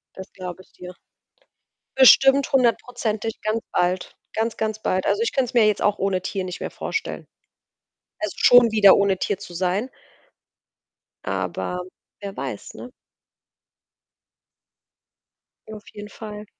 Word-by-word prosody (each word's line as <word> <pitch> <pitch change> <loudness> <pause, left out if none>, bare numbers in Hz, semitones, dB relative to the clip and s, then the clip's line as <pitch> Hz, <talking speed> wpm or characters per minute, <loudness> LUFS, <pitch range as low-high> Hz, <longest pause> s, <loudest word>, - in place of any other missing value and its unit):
Das 190 +1 -10
glaube 185 -1 -8
ich - - -29
dir. 180 0 -10 1.0
Bestimmt 270 +1 +6
hundertprozentig 235 -3 0
ganz 215 +1 -1
bald. 180 0 -1 0.2
Ganz, 225 +1 -1
ganz 220 0 -3
bald. 185 0 -1
Also, 450 - +1
ich 465 - -1
könnte 260 -3 0
es - - -26
mir 225 -3 +5
jetzt 210 - +1
auch 205 0 +1
ohne 190 -1 0
Tier 190 0 -3
nicht 180 -1 -6
mehr - - -5
vorstellen. 450 - -5 0.9
Also, 315 - -4
schon 245 -2 +6
wieder 200 -3 +7
ohne 200 -2 +1
Tier 200 0 -2
zu 180 - -11
sein 185 +8 -1 1.3
aber 180 0 -3 0.4
wer 200 -1 -7
weiß, 130 -6 -6
ne? 250 - -10 2.8
Auf 215 -1 -10
jeden 210 0 -9
Fall. 210 -1 -9
210 Hz, 135 wpm, -22 LUFS, 185-235 Hz, 2.8 s, wieder